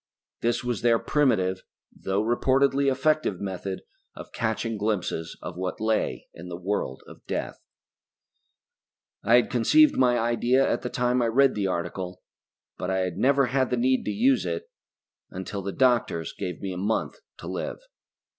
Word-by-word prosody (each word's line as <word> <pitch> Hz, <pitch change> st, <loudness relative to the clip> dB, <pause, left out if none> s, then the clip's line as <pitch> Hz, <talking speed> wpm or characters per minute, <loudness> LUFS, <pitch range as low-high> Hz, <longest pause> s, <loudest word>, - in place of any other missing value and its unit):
This 120 Hz, +2 st, 0 dB
was 120 Hz, -3 st, -2 dB
their 115 Hz, -1 st, +4 dB
primitive, 100 Hz, -11 st, +1 dB, 0.3 s
though 95 Hz, +2 st, -1 dB
reportedly 135 Hz, +4 st, +2 dB
effective 135 Hz, -, +1 dB
method 95 Hz, -1 st, -4 dB, 0.3 s
of -, -, -10 dB
catching 110 Hz, 0 st, -2 dB
glimpses 100 Hz, -6 st, -2 dB
of -, -, -6 dB
what 90 Hz, 0 st, -3 dB
lay 110 Hz, 0 st, 0 dB
in 85 Hz, -, -10 dB
the 85 Hz, -, -5 dB
world 90 Hz, -8 st, -3 dB
of -, -, -14 dB
death. -, -, -3 dB, 1.6 s
I 115 Hz, +4 st, +5 dB
had 120 Hz, -, +3 dB
conceived 290 Hz, -, +5 dB
my 125 Hz, -1 st, +4 dB
idea 120 Hz, +3 st, +2 dB
at -, -, 0 dB
the 125 Hz, -, -4 dB
time 125 Hz, +1 st, +1 dB
I 120 Hz, -, +2 dB
read 135 Hz, +3 st, +4 dB
the 100 Hz, -2 st, -1 dB
article, 90 Hz, +1 st, -4 dB, 0.6 s
but 90 Hz, -, -3 dB
I 95 Hz, 0 st, +1 dB
had 90 Hz, -1 st, -3 dB
never 135 Hz, +5 st, +3 dB
had 130 Hz, +1 st, +1 dB
the 125 Hz, -, 0 dB
need 130 Hz, +2 st, +2 dB
to -, -, -1 dB
use 125 Hz, +5 st, +3 dB
it 85 Hz, -2 st, -3 dB, 0.7 s
until 95 Hz, +2 st, -5 dB
the 100 Hz, +1 st, -4 dB
doctors 120 Hz, -, +1 dB
gave 90 Hz, 0 st, -5 dB
me 95 Hz, -1 st, -3 dB
a -, -, -6 dB
month 105 Hz, +4 st, -1 dB, 0.2 s
to -, -, -10 dB
live. -, -, -4 dB
110 Hz, 165 wpm, -26 LUFS, 95-125 Hz, 1.6 s, I